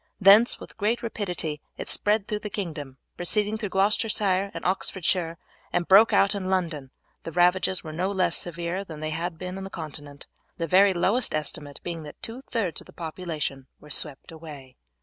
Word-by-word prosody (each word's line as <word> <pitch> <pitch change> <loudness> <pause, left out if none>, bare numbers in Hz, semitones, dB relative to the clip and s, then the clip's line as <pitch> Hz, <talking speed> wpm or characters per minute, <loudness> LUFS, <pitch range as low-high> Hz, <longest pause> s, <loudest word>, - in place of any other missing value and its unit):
Thence 205 +4 +7
with - - -12
great 225 +3 0
rapidity 180 -9 -2 0.2
it - - -5
spread 210 -1 +1
through 210 - -2
the 210 - -5
kingdom; 155 -10 -5 0.2
proceeding 210 +4 +1
through 210 -3 -3
Gloucestershire 200 -1 +2
and - - -7
Oxfordshire 180 -2 0 0.3
it 175 - 0
broke 205 +4 +8
out 195 +1 +4
in 190 -2 -3
London, 170 -7 0
and 130 - -24 0.3
the 165 - -6
ravages 180 +2 +3
were 155 -2 -7
no 185 +5 0
less 190 -2 +2
severe 175 +2 -2
than 160 -5 -9
they 155 0 -3
had 165 +1 -3
been 185 +2 -5
on - - -6
the 195 - -6
Continent, 145 -4 -8 0.3
the 165 - -1
very 190 +3 +5
lowest 205 +7 +2
estimate 150 -1 -3
being 170 -2 -4
that 150 -1 -10
two 235 +3 -7
thirds 200 -10 -1
of - - -16
the - - -15
population 155 -5 -4
were 150 - -13
swept 140 +1 -2
away. 150 -5 -10
180 Hz, 190 wpm, -26 LUFS, 155-200 Hz, 0.3 s, broke